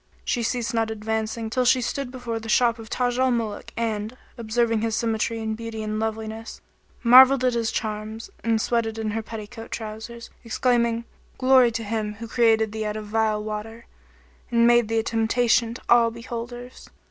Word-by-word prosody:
She 240 Hz, -, 0 dB
ceased 235 Hz, 0 st, -1 dB
not 225 Hz, -1 st, +1 dB
advancing 220 Hz, +1 st, -3 dB
till 255 Hz, +1 st, +1 dB
she 255 Hz, +1 st, +4 dB
stood 265 Hz, +2 st, -3 dB
before 245 Hz, -3 st, -5 dB
the 225 Hz, 0 st, -9 dB
shop 235 Hz, 0 st, +3 dB
of 220 Hz, -1 st, -10 dB
Taj 245 Hz, 0 st, 0 dB
al 260 Hz, 0 st, +3 dB
Muluk 230 Hz, -4 st, -2 dB
and, 220 Hz, +1 st, -2 dB, 0.2 s
observing 230 Hz, -1 st, 0 dB
his 225 Hz, -1 st, 0 dB
symmetry 225 Hz, 0 st, -1 dB
and 220 Hz, -1 st, -2 dB
beauty 225 Hz, -1 st, -6 dB
and 215 Hz, 0 st, -3 dB
loveliness, 220 Hz, 0 st, -4 dB, 0.4 s
marvelled 255 Hz, +2 st, +8 dB
at 250 Hz, -, +2 dB
his 230 Hz, -2 st, 0 dB
charms 215 Hz, -, -4 dB
and 225 Hz, -1 st, +2 dB
sweated 225 Hz, -1 st, 0 dB
in 220 Hz, -1 st, -2 dB
her 225 Hz, +1 st, -2 dB
petticoat 225 Hz, +1 st, -8 dB
trousers, 225 Hz, +1 st, -7 dB
exclaiming, 235 Hz, 0 st, +1 dB, 0.3 s
"Glory 255 Hz, -1 st, +5 dB
to 225 Hz, 0 st, -3 dB
Him 210 Hz, -1 st, -3 dB
who 230 Hz, +2 st, -8 dB
created 225 Hz, -2 st, +3 dB
thee 220 Hz, 0 st, -3 dB
out 210 Hz, 0 st, -3 dB
of 215 Hz, -, -6 dB
vile 215 Hz, -1 st, +1 dB
water, 215 Hz, +2 st, -6 dB, 0.6 s
and 235 Hz, -1 st, +3 dB
made 240 Hz, -1 st, +5 dB
thee 225 Hz, +1 st, -1 dB
a 225 Hz, -, +2 dB
temptation 230 Hz, +1 st, +1 dB
to -, -, -11 dB
all 235 Hz, -1 st, +5 dB
beholders!" 240 Hz, +2 st, -8 dB
225 Hz, 180 wpm, -24 LUFS, 220-240 Hz, 0.6 s, marvelled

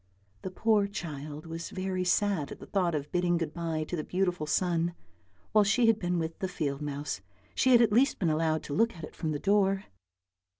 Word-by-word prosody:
The -, -, -4 dB
poor 210 Hz, +1 st, +2 dB
child 155 Hz, -6 st, -6 dB
was 165 Hz, +1 st, -6 dB
very 185 Hz, -1 st, -2 dB
sad 180 Hz, -4 st, +1 dB
at -, -, -7 dB
the -, -, -9 dB
thought 180 Hz, -5 st, 0 dB
of 145 Hz, -1 st, -4 dB
bidding 175 Hz, -1 st, +2 dB
good 165 Hz, -2 st, -3 dB
bye 165 Hz, -2 st, -2 dB
to 165 Hz, -, -4 dB
the 155 Hz, -, -3 dB
beautiful 180 Hz, -4 st, -1 dB
sun; 170 Hz, +1 st, +1 dB, 0.6 s
while 215 Hz, -1 st, +5 dB
she 230 Hz, +4 st, +3 dB
had 225 Hz, -1 st, +4 dB
been 180 Hz, -2 st, 0 dB
with 160 Hz, -1 st, -3 dB
the 190 Hz, -, -1 dB
field 145 Hz, -6 st, -3 dB
mouse 145 Hz, -8 st, -4 dB, 0.3 s
she 260 Hz, -, +3 dB
had 240 Hz, -1 st, +7 dB
at 215 Hz, -3 st, +2 dB
least 260 Hz, +5 st, +4 dB
been 170 Hz, -6 st, +1 dB
allowed 155 Hz, 0 st, +1 dB
to 145 Hz, -, -5 dB
look 230 Hz, +8 st, +2 dB
at 165 Hz, -, -10 dB
it -, -, -8 dB
from 160 Hz, -, -2 dB
the 150 Hz, -, -1 dB
door. 195 Hz, +2 st, +2 dB
175 Hz, 215 wpm, -29 LUFS, 155-195 Hz, 0.6 s, had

